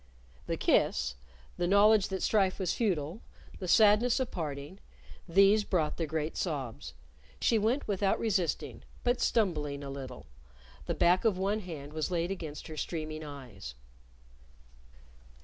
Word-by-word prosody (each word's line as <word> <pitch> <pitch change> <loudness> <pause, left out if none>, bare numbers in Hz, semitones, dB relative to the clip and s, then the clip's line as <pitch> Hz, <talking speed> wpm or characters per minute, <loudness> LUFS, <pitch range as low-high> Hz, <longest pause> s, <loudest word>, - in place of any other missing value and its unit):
The - - -1
kiss, - - +2 0.4
the 175 - 0
knowledge 205 +1 +5
that 190 -2 -4
strife 195 -4 +2
was 185 -3 -1
futile, 180 -4 -1 0.4
the 185 - -5
sadness 220 +5 +5
of 260 - -2
parting 150 +2 -5 0.5
these 195 +4 +5
brought 165 -7 0
the 165 - -2
great 155 +1 -2
sobs. 135 - -4 0.4
She 225 - +3
went 235 +7 0
without 200 -1 +1
resisting, 195 -6 -1 0.2
but 245 0 +1
stumbling 150 -10 0
a 140 - -6
little; 130 -2 -8 0.6
the - - -1
back 175 +2 +3
of 220 -5 +2
one 200 +3 0
hand 155 -7 -8
was 155 -1 -2
laid 175 0 -1
against 160 -6 -6
her 155 -2 -8
streaming 155 -1 -4
eyes. 125 - -9
175 Hz, 140 wpm, -30 LUFS, 150-205 Hz, 0.6 s, knowledge